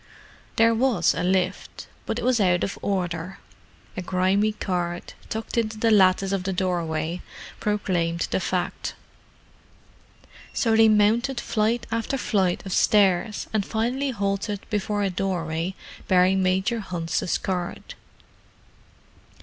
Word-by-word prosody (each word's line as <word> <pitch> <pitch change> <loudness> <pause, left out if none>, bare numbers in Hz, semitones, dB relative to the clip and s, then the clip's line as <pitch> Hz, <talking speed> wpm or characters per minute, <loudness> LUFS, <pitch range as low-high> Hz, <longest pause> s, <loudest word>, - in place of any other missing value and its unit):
There 230 0 +5
was 225 -7 +2
a - - -3
lift, 185 +1 -1 0.2
but - - -1
it - - -3
was 250 -2 +3
out 180 -3 +3
of 195 - -3
order; 180 -2 -2 0.6
a 190 - -3
grimy 190 +4 +1
card, 175 -4 -3 0.2
tucked 220 +1 -2
into 220 -1 -2
the 225 +1 +2
lattice 190 -1 +4
of 195 -2 0
the 190 - -1
doorway, 170 -2 -1 0.4
proclaimed 175 -5 0
the - - +1
fact. 180 0 -2 1.6
So 225 -2 +2
they 225 0 +6
mounted 225 +5 +3
flight 230 +2 0
after 230 +4 -1
flight 195 -7 0
of 190 - -4
stairs, 205 -1 +3
and 215 -2 +1
finally 245 +7 -1
halted 200 -2 -2
before 205 0 -1
a 195 - 0
doorway 175 -1 -2 0.3
bearing 185 +1 +4
Major 190 +5 +1
Hunt's 175 -3 -2
card. 180 -2 -4
195 Hz, 125 wpm, -24 LUFS, 180-220 Hz, 1.6 s, they